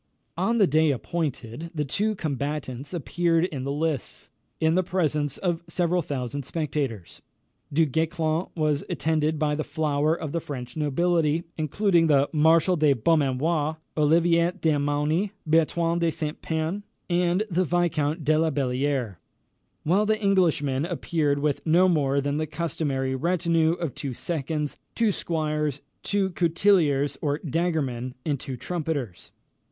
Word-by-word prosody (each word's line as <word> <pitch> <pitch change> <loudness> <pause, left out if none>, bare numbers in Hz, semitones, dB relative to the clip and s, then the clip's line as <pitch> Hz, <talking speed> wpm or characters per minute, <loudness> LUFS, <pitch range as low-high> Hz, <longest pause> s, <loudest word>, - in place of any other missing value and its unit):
On 235 +1 +1
the 205 - +6
day 155 -1 +3
appointed, 140 0 -3
the 150 -1 -1
two 210 +10 0
combatants 140 -4 -4
appeared 170 0 +1
in 140 -7 -5
the 140 - -2
lists, 150 -2 -3 0.3
in 160 0 +3
the 185 - +3
presence 155 -6 -1
of 175 -3 -1
several 175 +1 +1
thousand 140 -2 -4
spectators. 140 - -3 0.5
Du 160 +3 +3
Guesclin 160 +3 -1
was 150 -3 +1
attended 155 0 0
by 150 -1 +1
the 155 +1 -1
flower 150 0 0
of 155 - -4
the 170 - -1
French 130 -6 -7
nobility, 160 +1 +1
including 165 +2 +2
the 140 -2 +4
Marshal 160 +3 +4
de 150 -3 +4
Beaumanoir, 150 +3 +1 0.2
Olivier 170 +3 +3
de 155 -4 +2
Mauny, 150 +7 0
Bertrand 165 +2 +2
de 170 - +3
Saint 155 -1 -4
Pern, 160 +5 -2 0.3
and 175 +2 +2
the 180 +2 +2
Viscount 165 -3 0
de 155 +1 +3
la 160 0 +2
Bellière; 130 - -1 0.7
while 195 +7 +2
the 215 0 +2
Englishman 165 -9 +2
appeared 160 -4 0
with 145 -1 -1
no 170 +3 +4
more 140 -5 +2
than 140 +1 -1
the 155 0 -1
customary 145 -4 -2
retinue 165 +2 +1
of 170 -5 -4
two 135 -4 -5
seconds, 150 -1 -3 0.2
two 230 -3 +2
squires, 150 -5 -2 0.2
two 195 -2 0
coutilliers 165 -6 +2
or 145 -1 0
daggermen, 140 -6 -1
and 145 -4 0
two 130 -1 -6
trumpeters. 150 - -4
155 Hz, 140 wpm, -25 LUFS, 145-170 Hz, 0.7 s, the